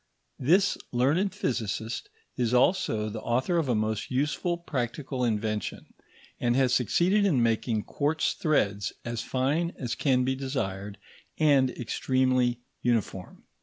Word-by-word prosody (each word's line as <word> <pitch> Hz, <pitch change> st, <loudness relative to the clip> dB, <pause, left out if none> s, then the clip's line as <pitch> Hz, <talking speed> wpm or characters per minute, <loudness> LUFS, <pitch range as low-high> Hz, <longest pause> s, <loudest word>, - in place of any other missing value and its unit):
This 185 Hz, +9 st, +3 dB
learned 145 Hz, +11 st, +2 dB
physicist 115 Hz, -, -3 dB, 0.3 s
is 125 Hz, -1 st, +1 dB
also 125 Hz, -, +2 dB
the 110 Hz, +1 st, -5 dB
author 130 Hz, +9 st, 0 dB
of 155 Hz, -5 st, 0 dB
a 120 Hz, -, +2 dB
most 110 Hz, 0 st, -1 dB
useful 150 Hz, +6 st, 0 dB
practical 130 Hz, -4 st, -3 dB
invention, 110 Hz, -2 st, -2 dB, 0.5 s
and 120 Hz, 0 st, +1 dB
has 130 Hz, -2 st, +3 dB
succeeded 175 Hz, -, +3 dB
in 150 Hz, -12 st, +3 dB
making 115 Hz, -1 st, 0 dB
quartz 155 Hz, +2 st, 0 dB
threads 100 Hz, -, 0 dB
as 120 Hz, -1 st, -3 dB
fine 145 Hz, +7 st, 0 dB
as 125 Hz, -3 st, -3 dB
can 130 Hz, -3 st, +2 dB
be 130 Hz, +1 st, +1 dB
desired 105 Hz, -7 st, -4 dB, 0.4 s
and 140 Hz, -4 st, +4 dB
extremely 130 Hz, 0 st, +1 dB, 0.2 s
uniform. 110 Hz, -6 st, -2 dB
125 Hz, 130 wpm, -28 LUFS, 115-145 Hz, 0.5 s, and